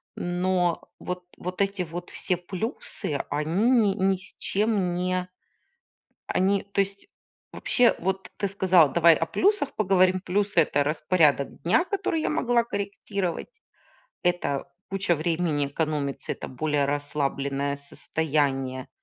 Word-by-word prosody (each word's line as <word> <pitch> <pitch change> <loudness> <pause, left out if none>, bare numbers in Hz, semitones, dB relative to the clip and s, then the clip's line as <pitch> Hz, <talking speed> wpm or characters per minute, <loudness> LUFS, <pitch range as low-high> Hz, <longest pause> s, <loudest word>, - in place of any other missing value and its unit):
Но 175 -1 0
вот 180 0 -5
вот 180 +2 -4
эти 200 -1 0
вот 175 +1 -7
все 180 - -1
плюсы, 180 - -4
они 160 +11 +1
ни 220 -6 +4
ни 195 -1 +2
с 185 - -13
чем 200 -4 0
не 180 0 -1 1.0
Они, 195 +1 +2
то 200 - +4
есть, 200 0 -4 0.4
вообще, 245 -2 +3
вот 190 +2 -2
ты 200 - 0
сказала: 185 -5 +4
"Давай 170 0 +6
о 165 - -1
плюсах 385 - +1
поговорим". 185 -2 +3
Плюсы- 200 0 +1
это 145 -2 +1
распорядок 150 -2 +1
дня, 180 - +3
который 370 -5 -1
я - - 0
могла 245 -5 +2
корректировать, 200 - -3 0.7
это 175 -6 0 0.2
куча 195 -2 +1
времени 160 -2 0
экономится, 145 -1 -2
это - - -7
более 145 +2 0
расслабленное 140 -1 -1
состояние. 140 -2 -2
180 Hz, 125 wpm, -26 LUFS, 150-195 Hz, 1.0 s, Давай